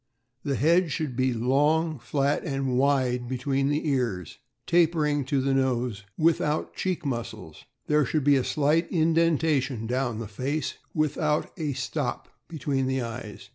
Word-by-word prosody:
— 125 Hz, +1 st, -51 dB
The 140 Hz, -, -1 dB
head 170 Hz, +5 st, +3 dB
should 140 Hz, -3 st, -2 dB
be 130 Hz, +1 st, +2 dB
long, 145 Hz, +6 st, +1 dB
flat, 140 Hz, +4 st, 0 dB
and 135 Hz, -5 st, -1 dB
wide 130 Hz, -2 st, +2 dB
between 135 Hz, +2 st, 0 dB
the 150 Hz, +2 st, -1 dB
ears, 115 Hz, -, -1 dB, 0.3 s
tapering 155 Hz, -4 st, +2 dB
to 140 Hz, 0 st, 0 dB
the 135 Hz, +1 st, +1 dB
nose, 125 Hz, -5 st, 0 dB
without 155 Hz, -2 st, +1 dB
cheek 185 Hz, -4 st, -2 dB
muscles. 115 Hz, -, -5 dB, 0.2 s
There 150 Hz, 0 st, +3 dB
should 150 Hz, +3 st, 0 dB
be 145 Hz, 0 st, +5 dB
a 130 Hz, -, +2 dB
slight 155 Hz, +5 st, +1 dB
indentation 160 Hz, -, +2 dB
down 125 Hz, -1 st, -1 dB
the 115 Hz, -1 st, -5 dB
face, 135 Hz, +9 st, -2 dB, 0.2 s
without 155 Hz, 0 st, 0 dB
a 155 Hz, -5 st, -2 dB
"stop" 135 Hz, 0 st, -3 dB, 0.2 s
between 140 Hz, -4 st, -1 dB
the 130 Hz, -1 st, 0 dB
eyes. 115 Hz, -2 st, -7 dB
140 Hz, 150 wpm, -26 LUFS, 125-155 Hz, 0.3 s, be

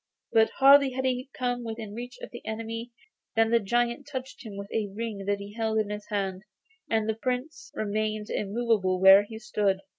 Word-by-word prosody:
But 225 Hz, 0 st, +5 dB
hardly 275 Hz, -1 st, +7 dB
had 260 Hz, +1 st, -2 dB
he 255 Hz, +1 st, -1 dB
come 245 Hz, -1 st, -2 dB
within 220 Hz, -2 st, -6 dB
reach 245 Hz, +3 st, -7 dB
of -, -, -7 dB
the 240 Hz, -, -9 dB
enemy, 230 Hz, +2 st, -5 dB, 0.4 s
than 225 Hz, 0 st, +3 dB
the 235 Hz, -, +5 dB
giant 240 Hz, +5 st, 0 dB
touched 260 Hz, -1 st, -6 dB
him 210 Hz, -4 st, -8 dB
with 200 Hz, 0 st, -7 dB
a 220 Hz, -2 st, 0 dB
ring 205 Hz, -1 st, -5 dB
that 205 Hz, 0 st, +1 dB
he 200 Hz, +1 st, -9 dB
held 220 Hz, -1 st, -1 dB
in 215 Hz, -1 st, 0 dB
his 210 Hz, 0 st, -6 dB
hand, 195 Hz, -2 st, -2 dB, 0.5 s
and 220 Hz, -1 st, +1 dB
the 220 Hz, -, +1 dB
Prince 255 Hz, +7 st, -4 dB
remained 215 Hz, 0 st, -2 dB
immovable 205 Hz, -3 st, 0 dB
where 190 Hz, +1 st, +9 dB
he 220 Hz, +2 st, -8 dB
stood. 205 Hz, -4 st, 0 dB
220 Hz, 190 wpm, -27 LUFS, 205-240 Hz, 0.5 s, where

